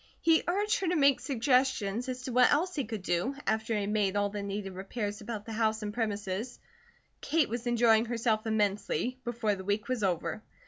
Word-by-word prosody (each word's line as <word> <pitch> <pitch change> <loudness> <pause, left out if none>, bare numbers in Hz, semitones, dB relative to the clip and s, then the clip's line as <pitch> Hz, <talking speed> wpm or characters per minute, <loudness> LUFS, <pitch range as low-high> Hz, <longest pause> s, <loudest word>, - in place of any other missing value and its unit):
He 325 -1 +4
urged 410 +4 +1
her 380 - -1
to 355 - +1
make 280 -3 +4
suggestions 250 -3 +1
as 255 0 -5
to 255 - -4
what 250 +1 +5
else 345 +6 +2
he 280 -6 -2
could 220 -5 -5
do, 180 +11 0
after 220 +1 0
he 210 - 0
had 200 +1 -2
made 205 -2 +1
all 205 0 +1
the 205 0 -4
needed 200 -1 -4
repairs 205 +2 -4
about 215 -1 -6
the 225 - -6
house 220 0 0
and 210 0 -4
premises. 210 +1 -3 0.6
Kate 315 -5 +1
was 240 +2 -4
enjoying 230 -1 +4
herself 230 -2 0
immensely, 220 +4 0
before 235 -3 -1
the 190 -1 -6
week 205 +2 -1
was 255 -3 -1
over. 175 -1 -1
220 Hz, 200 wpm, -30 LUFS, 205-255 Hz, 0.6 s, what